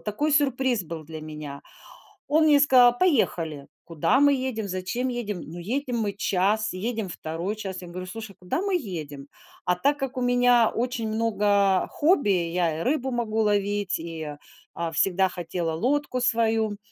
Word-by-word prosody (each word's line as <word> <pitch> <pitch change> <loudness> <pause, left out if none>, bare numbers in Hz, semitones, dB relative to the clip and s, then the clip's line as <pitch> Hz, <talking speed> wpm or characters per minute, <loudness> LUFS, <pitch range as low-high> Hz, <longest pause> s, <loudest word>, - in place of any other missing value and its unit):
такой 285 +9 -1
сюрприз 265 -6 +2
был 160 -1 -7
для 155 0 -8
меня. 150 -2 -8 0.7
Он 315 +2 +3
мне 295 -2 +6
сказал: 250 -3 +6
"Поехали". 165 - +1 0.2
Куда 170 - +1
мы 285 0 +5
едем? 255 -5 -2
Зачем 190 +7 -2
едем? 225 -7 -3
Ну, 160 +3 -9
едем 245 +7 -2
мы 210 -3 -1
час, 205 +3 0
едем 220 +2 -3
2 170 +5 -4
час. 190 -3 -6
Я 180 - -9
говорю: 180 +1 -7
"Слушай, 220 0 -8
куда 180 - -2
мы 395 -1 0
едем?" 155 - -5 0.4
А 180 - +2
так 285 +10 +1
как 270 -2 -4
у - - -1
меня 245 -2 +4
очень 240 -1 -2
много 205 -3 +2
хобби: 295 - +2
я 170 -3 0
и - - -2
рыбу 265 -1 0
могу 230 -3 -1
ловить, 205 -1 0
и, 160 -3 -6 0.4
а, 170 -1 -3
всегда 190 +3 +2
хотела 170 -1 -3
лодку 255 - 0
свою. 225 -3 +1
210 Hz, 165 wpm, -25 LUFS, 175-245 Hz, 0.7 s, мне